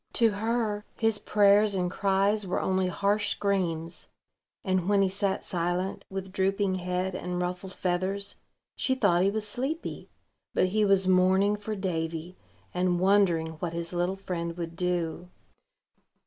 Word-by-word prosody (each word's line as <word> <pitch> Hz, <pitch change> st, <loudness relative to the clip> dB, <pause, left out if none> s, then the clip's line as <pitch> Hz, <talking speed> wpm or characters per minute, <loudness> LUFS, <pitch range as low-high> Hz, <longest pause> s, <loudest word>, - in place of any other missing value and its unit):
To 230 Hz, -2 st, +4 dB
her, 215 Hz, 0 st, -1 dB, 0.2 s
his 225 Hz, -2 st, +2 dB
prayers 205 Hz, 0 st, +4 dB
and 180 Hz, -1 st, 0 dB
cries 200 Hz, +1 st, +1 dB
were 180 Hz, -, 0 dB
only 190 Hz, 0 st, +1 dB
harsh 205 Hz, +3 st, +1 dB
screams; 175 Hz, -5 st, -1 dB, 0.6 s
and, 185 Hz, -2 st, 0 dB
when 200 Hz, -1 st, +4 dB
he -, -, +3 dB
sat 195 Hz, 0 st, -1 dB
silent, 175 Hz, +2 st, -2 dB
with 190 Hz, 0 st, -5 dB
drooping 195 Hz, +1 st, +1 dB
head 180 Hz, 0 st, -2 dB
and 180 Hz, 0 st, -3 dB
ruffled 180 Hz, +1 st, -4 dB
feathers, 190 Hz, +2 st, -1 dB, 0.4 s
she 260 Hz, -, 0 dB
thought 200 Hz, -8 st, +3 dB
he 195 Hz, -, +4 dB
was 215 Hz, +1 st, -2 dB
sleepy: 270 Hz, +10 st, -4 dB, 0.5 s
but 185 Hz, -, +3 dB
he 215 Hz, +3 st, +2 dB
was 195 Hz, -1 st, +3 dB
mourning 190 Hz, +2 st, +4 dB
for 210 Hz, +1 st, -5 dB
Davy, 170 Hz, -2 st, -3 dB, 0.4 s
and 180 Hz, -1 st, +1 dB
wondering 185 Hz, -4 st, +3 dB
what 170 Hz, 0 st, -3 dB
his 170 Hz, +1 st, -4 dB
little 175 Hz, +2 st, 0 dB
friend 170 Hz, -3 st, -4 dB
would 165 Hz, -1 st, -5 dB
do. 175 Hz, 0 st, -2 dB
190 Hz, 150 wpm, -28 LUFS, 180-205 Hz, 0.6 s, To